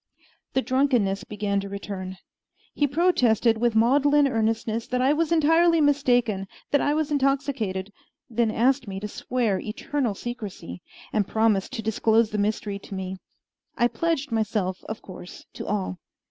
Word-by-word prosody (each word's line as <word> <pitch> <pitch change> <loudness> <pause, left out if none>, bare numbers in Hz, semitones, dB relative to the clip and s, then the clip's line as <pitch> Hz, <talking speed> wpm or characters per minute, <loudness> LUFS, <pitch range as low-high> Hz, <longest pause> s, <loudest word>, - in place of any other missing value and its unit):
The 265 - +1
drunkenness 250 -6 +1
began 205 -1 -1
to 200 0 -5
return. 190 -2 -6 0.6
He 290 - +1
protested 250 - +3
with 235 -1 +1
maudlin 285 +5 +4
earnestness 225 -1 -1
that 250 - -1
I 265 +3 +3
was 325 +1 0
entirely 330 +1 +4
mistaken 245 -9 +2 0.2
that 285 - +3
I 290 - +1
was 310 -1 -1
intoxicated; 270 -9 0 0.3
then 235 -1 +1
asked 255 +3 +2
me 195 -1 -5
to 210 - -4
swear 225 -2 -1
eternal 235 +1 -2
secrecy, 205 - -7 0.3
and 205 -2 +1
promised 220 -1 +1
to 225 -4 -4
disclose 220 0 +2
the 210 - -1
mystery 205 -1 -1
to 200 - -9
me. 190 0 -4 0.6
I 240 - +4
pledged 315 -1 -1
myself, 210 -4 -1
of 220 - -6
course, 180 -1 -11
to - - -7
all. 190 -3 -2
225 Hz, 150 wpm, -25 LUFS, 205-275 Hz, 0.6 s, maudlin